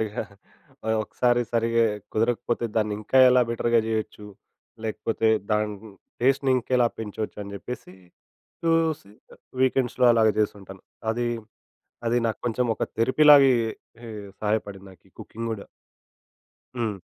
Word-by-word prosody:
సరిగ్గా, 110 -1 -3 0.8
ఒకసారి 120 +1 +1
సరిగ్గా 115 0 +2 0.3
కుదరకపోతే 120 +1 0
దాన్ని 105 -1 +1
ఇంకా 130 +5 +1
ఎలా 125 0 +5
బెటర్‌గా 115 0 +2
చేయొచ్చు? 110 -1 -3 0.6
లేకపోతే 110 0 -1 0.2
దాని 105 0 +1 0.5
టేస్ట్‌ని 135 +1 +2
ఇంకెలా 125 0 +2
పెంచొచ్చు 110 -1 -5
అని 100 - -9
చెప్పేసి, 110 -4 -8 0.7
చూసి 165 -9 +1 0.5
వీకెండ్స్‌లో 130 -1 +2
అలాగా 110 -2 +4
చేస్తుంటాను. 95 -3 -3 0.3
అది, 120 +1 -1 0.8
అది 120 +1 +2
నాకు 110 - -2
కొంచెం 120 +1 0
ఒక - - -6
థెరపీ 130 +7 +2
లాగే, 140 -2 +8 0.5
హే 115 - -8 0.3
సహాయపడింది 105 -2 -2
నాకీ 90 - -23
కుకింగ్ 115 +1 -6
కూడా. 100 -3 -7 1.1
హ్మ్. 105 -4 -2
115 Hz, 115 wpm, -25 LUFS, 105-125 Hz, 1.1 s, లాగే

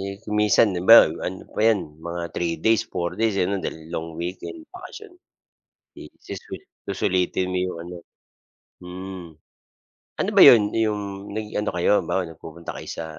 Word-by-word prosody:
Eh, 100 0 -4
kung 105 -1 -4
minsan 105 +1 +5
'di 90 -1 -3
ba, 115 - +12 0.3
ano 95 +1 -5
pa - - -3
'yan 110 -3 +4 0.3
mga 85 0 -4
3 85 -1 -1
days, 110 -1 +4
4 85 0 -2
days, 115 -3 +2
eh, 90 - +2
'no, 100 - 0
dahil - - -4 0.2
long 80 +1 -4
weekend 90 - -6 0.2
bakasyon. 400 +2 -10 0.9
Eh, - - -11
suswel - - -8 0.3
susulitin 95 -1 0
mo 90 - -1
yung 90 - -5
ano, 90 +1 -9 0.9
mm. 90 0 -8 0.9
Ano - - 0
ba - - +7
'yon 115 - +9
'yong 110 -2 0 0.3
nag 110 -1 -3
ano 105 - -1
kayo 85 - +2
halimbawa, 95 - -1
nagpupunta 80 0 -9
kayo - - -9
sa 80 - -4
95 Hz, 170 wpm, -23 LUFS, 85-105 Hz, 0.9 s, ba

